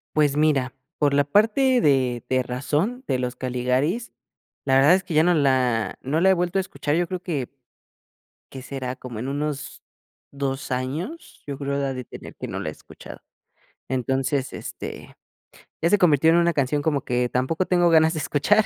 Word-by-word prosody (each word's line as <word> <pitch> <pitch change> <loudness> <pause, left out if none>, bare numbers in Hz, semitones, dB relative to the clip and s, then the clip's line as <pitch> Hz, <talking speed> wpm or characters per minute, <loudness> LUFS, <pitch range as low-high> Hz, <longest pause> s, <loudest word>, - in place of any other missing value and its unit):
Pues 145 -2 +3
mira, 145 -4 +2 0.2
por 145 -2 +2
la 145 0 +4
parte 225 - +3
de 130 - +2
de 130 0 +2
razón, 150 - -2
de 130 - 0
Los 125 0 -3
Caligaris, 130 - -1 0.5
la 135 -1 +3
verdad 140 +6 +6
es 190 - -1
que 170 - -6
ya 155 - +5
no 175 +1 +4
la 130 -6 +1
no 145 +5 -1
la 190 - +5
he - - +6
vuelto 180 +1 -1
a - - +3
escuchar, 155 -5 -3
yo 175 +1 +1
creo 185 +1 -4
que, 145 -9 -3 1.0
¿qué 130 - -8
será?, 130 -1 -5
como 125 -4 -8
en 125 +4 -4
unos 145 0 -4 0.5
2 140 -1 -4
años, 145 - -4
yo 140 -1 -4
creo 140 -1 -2
ha 135 -1 -2
de 125 - -6
tener - - -11
que - - -6
no - - -4
la - - -4
he - - -4
escuchado. - - -13 0.7
Entonces, 130 +2 -1
este, - - -8 0.7
ya 165 - +2
se 205 - +5
convirtió 160 -4 +4
en 165 - +5
una 170 0 +3
canción 145 0 0
como 145 -2 0
que 125 0 0
tampoco 130 +9 0
tengo 175 -1 +3
ganas 160 0 +5
de 155 - -3
escuchar. 200 +9 +2
145 Hz, 190 wpm, -23 LUFS, 130-170 Hz, 1.0 s, verdad